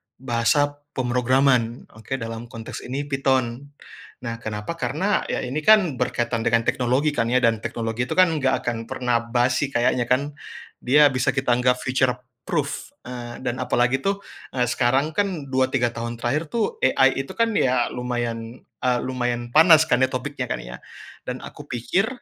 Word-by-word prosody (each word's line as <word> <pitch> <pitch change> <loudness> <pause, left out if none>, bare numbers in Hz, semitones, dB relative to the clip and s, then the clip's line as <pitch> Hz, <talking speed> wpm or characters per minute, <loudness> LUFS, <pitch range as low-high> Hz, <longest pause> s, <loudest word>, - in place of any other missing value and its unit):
bahasa 135 +4 +1 0.2
pemrograman. 125 -1 +2 0.2
Oke, 130 +4 -4
dalam 115 -1 -6
konteks 115 -1 -8
ini 135 +3 -3
Python. 135 -2 0 0.6
Nah, 115 -1 -4
kenapa, 105 +6 -4
karena, 190 +9 0
ya, - - -2
ini, 130 +4 -2
kan, 180 - +4
berkaitan 120 -1 -1
dengan 115 0 +3
teknologi, 130 +6 +1
kan, 115 -6 0
ya, 125 +1 +2
dan 115 -1 +3
teknologi 115 +2 -3
itu, - - -3
kan, 185 -2 +5
enggak 130 -1 +1
akan 115 -2 -3
pernah 125 -2 0
basi 120 +4 +1
kayaknya, 120 -2 +1
kan. 140 +4 +1 0.5
Dia 145 +3 +5
bisa 125 -1 +1
kita 130 -2 +1
anggap 125 0 +2
future 130 -1 +1 0.3
proof, 150 - -2 0.2
eee, 120 -1 -7
dan 125 0 -2
apalagi, 125 +2 +1
tuh, 200 +3 -1 0.3
eee, 125 - +2
sekarang, 130 +5 +1
kan, 185 -9 -1
2, 130 0 +2
3 120 -3 +1
tahun 120 0 -5
terakhir, 145 +8 -1
tuh, 225 -3 -1
AI 135 +1 +3
itu, - - -8
kan, 230 0 +2
ya, 125 -6 +2
lumayan, 120 -1 -4 0.2
eee, 125 -1 +1
lumayan 120 -2 -2
panas, 160 +2 +7
kan, 125 - +3
ya, - - +4
topiknya, 130 0 -3
kan, - - -2
ya. - - -9 0.5
Dan - - -4
aku - - -10
pikir 125 - 0
125 Hz, 165 wpm, -23 LUFS, 120-140 Hz, 0.6 s, panas